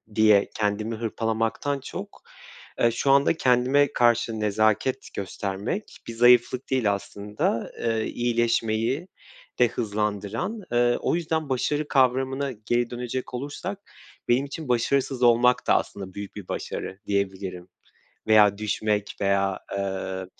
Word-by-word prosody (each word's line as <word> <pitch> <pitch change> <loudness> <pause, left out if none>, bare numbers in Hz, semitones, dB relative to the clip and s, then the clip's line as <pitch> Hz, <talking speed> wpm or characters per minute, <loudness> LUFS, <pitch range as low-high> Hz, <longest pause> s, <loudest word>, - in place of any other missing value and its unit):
diye 105 -2 +5
kendimi 105 +2 -1
hırpalamaktan 115 +5 -1
çok, - - -8 0.6
eee, 115 - +4
şu 135 +4 +1
anda 140 0 +5
kendime 130 0 +3
karşı 120 -2 +2
nezaket 110 +5 +1
göstermek 100 - -4
bir 115 - -5
zayıflık 120 +2 +4
değil 120 -6 +2
aslında, 105 +3 -3
eee, 115 -1 0
iyileşmeyi 120 +4 0 0.5
de 125 - +6
hızlandıran. 105 - -3
Eee, 120 0 +3
o - - 0
yüzden 160 -3 -2
başarı 145 +3 0
kavramına 135 +1 +1
geri 120 +1 -1
dönecek 125 +1 -5
olursak 145 +10 -5 0.5
benim 125 +3 +2
için 140 0 -7
başarısız 125 +1 +1
olmak 120 +1 +4
da - - +5
aslında 95 -2 -3
büyük 100 +1 -8
bir 100 -3 -8
başarı 95 - -5
diyebilirim. 95 -3 -2 0.6
Veya 105 -2 +6
düşmek 105 -1 -1
veya, 100 -1 +1 0.2
eee, 95 -1 -3
115 Hz, 120 wpm, -25 LUFS, 105-130 Hz, 0.6 s, de